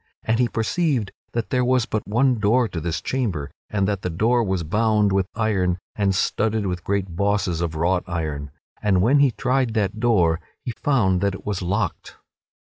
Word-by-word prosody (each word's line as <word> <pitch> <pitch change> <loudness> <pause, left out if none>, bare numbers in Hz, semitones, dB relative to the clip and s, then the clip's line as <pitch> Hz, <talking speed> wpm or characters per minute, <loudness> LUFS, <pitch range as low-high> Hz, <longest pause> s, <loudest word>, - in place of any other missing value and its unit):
And 110 +1 +1
he 125 - +3
perceived 120 - 0 0.2
that 115 -1 -2
there 125 -1 +2
was 125 -1 +2
but 110 - -3
one 120 +3 +2
door 115 +4 +3
to 85 -5 -5
this 85 0 -2
chamber 95 - -2 0.2
and 100 -2 0
that 100 -2 -1
the 90 - -2
door 115 +8 +2
was 95 -4 -1
bound 105 +4 +2
with 95 -1 +1
iron 95 -5 +1 0.2
and 100 -2 +1
studded 105 +2 0
with 90 -2 -3
great 95 -3 -2
bosses 100 -3 0
of 85 -2 -2
wrought 90 +3 +1
iron, 75 -5 -3 0.3
and 95 -3 +2
when 135 +6 +4
he 140 -1 +5
tried 125 -1 0
that 105 0 0
door 90 -9 +3 0.3
he 125 - -2
found 95 -11 +2
that 100 -1 +1
it - - -12
was 100 -2 -2
locked. 95 +1 -2
100 Hz, 190 wpm, -23 LUFS, 90-115 Hz, 0.3 s, he